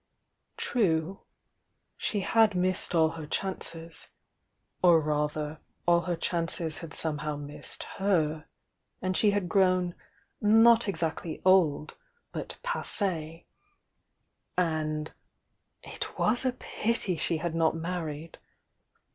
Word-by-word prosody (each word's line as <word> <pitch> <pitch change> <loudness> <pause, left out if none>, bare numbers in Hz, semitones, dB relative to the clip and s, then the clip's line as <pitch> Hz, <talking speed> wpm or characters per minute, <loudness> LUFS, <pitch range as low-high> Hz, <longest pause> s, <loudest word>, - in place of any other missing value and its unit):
True,— 185 -5 0 0.8
slie 205 -3 -1
had 220 -2 +4
missed 180 0 0
all 160 -1 +5
her 160 -2 -7
chances,— 165 -2 -4 0.7
or 175 -2 +7
rather 150 0 -1 0.3
all 170 0 +5
her 175 - +1
chances 165 -2 -1
had 165 -2 -8
somehow 150 -2 -1
missed 145 0 -6
her; 160 -6 +1 0.5
and 185 0 -1
she 210 - +4
had 205 -3 0
^own 185 -1 +3 0.5
not 225 +2 +6
exactly 165 -3 -2
old, 165 -6 +3 0.3
but - - -6
pauie 175 - -2 0.6
— - - -49 0.2
and 155 0 -2 0.4
— - - -49
it - - -5
was 240 +4 +2
a 255 - +2
pity 230 -6 -1
she 165 +1 0
had 165 +1 -3
not 165 -1 +2
married! 165 -2 -5
170 Hz, 115 wpm, -29 LUFS, 155-190 Hz, 0.8 s, or